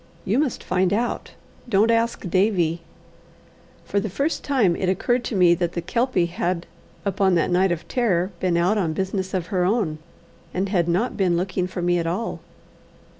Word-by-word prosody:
"You 215 +7 +1
must 285 -5 -1
find 180 0 +1
out. 235 +3 -2 0.4
Don't 215 +1 +4
ask 230 -3 0
Davie." 180 -3 +1 1.0
For 200 - 0
the 205 - -3
first 280 - -1
time 235 -12 +2
it 185 - -1
occurred 240 +6 +1
to 225 - -3
me 180 -2 +5
that 175 -1 -1
the - - -2
Kelpie 235 -7 +1
had 175 0 -2 0.4
upon 195 -1 +2
that 170 +1 +1
night 185 +1 +3
of 170 -1 -3
terror 195 -7 +1
been 180 -2 +1
out 185 +5 +2
on 165 -5 0
business 190 +2 -2
of 180 +2 -3
her 180 -1 +2
own, 180 -6 0 0.6
and 190 +2 0
had 175 -4 +1
not 185 +9 0
been 180 -4 +2
looking 185 0 -1
for 180 -1 -5
me 175 0 +2
at 165 - -2
all. 190 +7 -2
185 Hz, 180 wpm, -23 LUFS, 175-210 Hz, 1.0 s, me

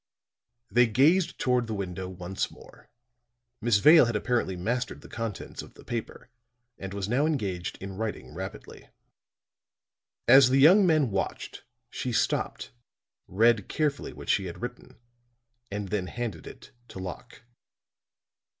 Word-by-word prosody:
They 120 0 +5
gazed 155 - +3
toward 125 -2 +1
the 110 - -3
window 95 -2 -5
once 90 +1 -4
more, - - -17 0.7
Miss 115 -2 +3
Vale 155 +6 +7
had 115 -1 -2
apparently 115 -3 0
mastered 120 +7 -3
the - - -13
contents 115 -3 -6
of - - -14
the - - -15
paper, 120 +1 -6 0.5
and 95 0 -6
was 100 -1 -4
now 130 +7 +2
engaged 100 - -2
in 95 0 -7
writing 110 0 -5
rapidly. - - -9 1.4
As 130 +1 +8
the 130 - +3
young 180 +8 +7
men 155 -8 +3
watched, 95 +3 -4 0.3
she 125 - -3
stopped, 110 - -1 0.6
read 110 +2 +2
carefully 150 -2 -1
what - - -11
she 95 - +2
had 90 +5 -8
written, 120 0 -8 0.7
and 100 -1 -4
then 95 -2 -2
handed 105 - -5
it - - -12 0.2
to - - -11
Locke. 95 +7 -8
115 Hz, 140 wpm, -27 LUFS, 95-125 Hz, 1.4 s, As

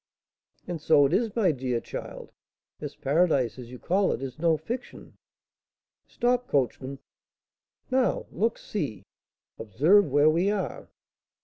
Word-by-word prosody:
"And 175 -3 -4
so 150 -2 +5
it 140 - 0
is, 220 +1 0
my 205 -7 +3
dear 125 -4 -2
child! - - -8 0.5
This - - -7
paradise, 140 -5 +1
as 120 -2 -9
you 125 - -9
call 190 +8 +1
it, - - -4
is 130 +1 -7
no 165 -1 +3
fiction." 235 +11 -7 0.9
"Stop, 245 0 0
coachman!" 135 0 -1 0.9
"Now 255 -1 +1
look! 225 +2 0
see! 125 - -4 0.6
observe 150 - +4
where 145 +2 +4
we 175 +5 +1
are!" 205 -2 -3
160 Hz, 130 wpm, -27 LUFS, 130-205 Hz, 0.9 s, so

